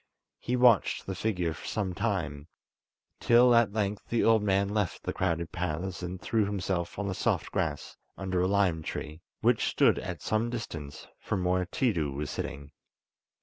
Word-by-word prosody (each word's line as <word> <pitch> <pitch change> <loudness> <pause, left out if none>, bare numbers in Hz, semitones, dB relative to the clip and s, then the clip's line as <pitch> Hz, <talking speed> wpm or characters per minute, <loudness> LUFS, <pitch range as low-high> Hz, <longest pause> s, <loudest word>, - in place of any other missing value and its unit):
He 125 - -1
watched 120 -5 +4
the 95 - -3
figure 90 -4 -1
for 75 - -9
some 100 -4 -2
time, 80 -8 -2 0.7
till 120 +1 +6
at 115 -3 +4
length 105 -1 -2
the 120 - +1
old 115 -1 +5
man 100 -1 +2
left 105 -4 -1
the - - -3
crowded 85 -2 -1
paths, 90 +2 -3
and 90 +1 -5
threw 110 +2 +1
himself 95 -4 -2
on 105 0 -2
the 95 - -1
soft - - -1
grass - - -2 0.2
under 95 -2 -1
a 90 - +2
lime 95 -5 +2
tree, 80 0 -6 0.2
which - - +3
stood - - +3
at 90 -6 -6
some 110 +2 0
distance 80 -11 -6
from 95 -3 -2
where 90 0 +1
Tiidu 85 - 0
was 75 0 -3
sitting. 70 0 -5
95 Hz, 170 wpm, -29 LUFS, 85-105 Hz, 0.7 s, till